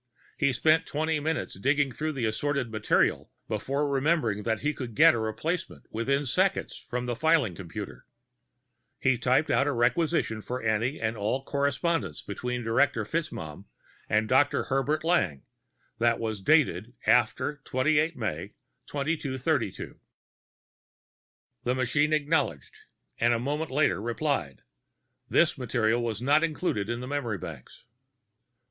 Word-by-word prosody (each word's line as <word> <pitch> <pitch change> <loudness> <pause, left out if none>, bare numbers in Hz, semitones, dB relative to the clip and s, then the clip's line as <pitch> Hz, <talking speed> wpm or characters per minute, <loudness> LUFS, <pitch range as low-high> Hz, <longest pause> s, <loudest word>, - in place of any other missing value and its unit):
He 140 -3 +2
spent 155 +6 +3
twenty 155 +1 0
minutes 155 -9 -3
digging 140 +4 +2
through 155 +5 -3
the 130 -4 -2
assorted 130 +2 -1
material 110 -1 +1 0.2
before 135 +7 -1
remembering 140 -6 +1
that 110 0 -1
he 150 +1 0
could 125 -6 -7
get - - +7
a 120 - -1
replacement 155 +11 -3
within 140 +6 0
seconds 185 +9 0
from 125 0 -5
the 120 -1 -2
filing 155 - +2
computer. 80 -8 -8 0.9
He 130 -3 +2
typed 130 +5 +2
out 140 - +3
a - - +2
requisition 125 -1 +1
for 125 +4 -4
any 115 +5 0
and 110 0 -1
all 110 +6 -1
correspondence 140 +4 -1
between 125 -1 -4
Director 115 +1 +2
FitzMaugham 100 - -4 0.4
and 110 +1 +2
Dr. 130 +4 +3
Herbert 140 +3 0
Lang 165 - +1 0.6
that 115 0 +3
was 110 -3 -3
dated 130 -2 +2
after 125 +5 +2
28 155 +5 +1
May 100 -4 -4 0.3
2232. 140 -3 -2 1.6
The 125 - 0
machine 130 +4 +1
acknowledged, 145 - 0 0.5
and 120 +1 +3
a - - -1
moment 150 +6 -2
later 140 -7 +1
replied, 120 - -2 0.7
This 160 -4 +3
material 120 -1 +1
is 110 +1 -5
not 145 +4 +4
included 150 - -1
in 120 +2 -3
memory 130 -7 -2
banks. - - -10
130 Hz, 130 wpm, -28 LUFS, 115-150 Hz, 1.6 s, get